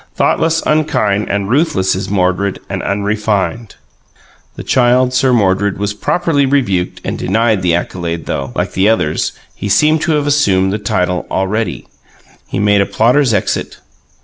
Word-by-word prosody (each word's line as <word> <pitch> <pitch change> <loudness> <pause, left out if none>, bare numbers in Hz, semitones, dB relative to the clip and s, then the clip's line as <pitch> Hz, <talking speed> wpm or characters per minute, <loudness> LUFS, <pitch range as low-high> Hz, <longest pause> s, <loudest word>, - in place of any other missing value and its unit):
Thoughtless, 165 0 +1
unkind, 110 -10 +1
And 100 -1 -1
ruthless 105 - +1
is 95 +1 -4
Mordred, 95 0 0
and - - -4
unrefined." 105 +2 -2 0.8
The - - -7
Child 125 0 +2
Mordred 100 -6 +2
was 100 +1 -2
properly 155 - 0
rebuked 120 -11 0
and - - -4
denied 110 -3 +1
the 85 -2 +2
accolade, 85 -1 -4
though, 70 -2 -3
like - - -2
the 95 +3 +2
others, 95 -9 0 0.2
he 100 - -5
seemed 150 +9 +3
to 165 - +1
have 150 -1 0
assumed 100 -10 +2
the 105 - -2
title 90 -3 -1
already. 105 +4 -2 0.6
He - - -4
made 105 0 +3
a 100 - 0
plotter's 125 +3 +2
exit. 105 -3 -1
105 Hz, 150 wpm, -15 LUFS, 95-125 Hz, 0.8 s, seemed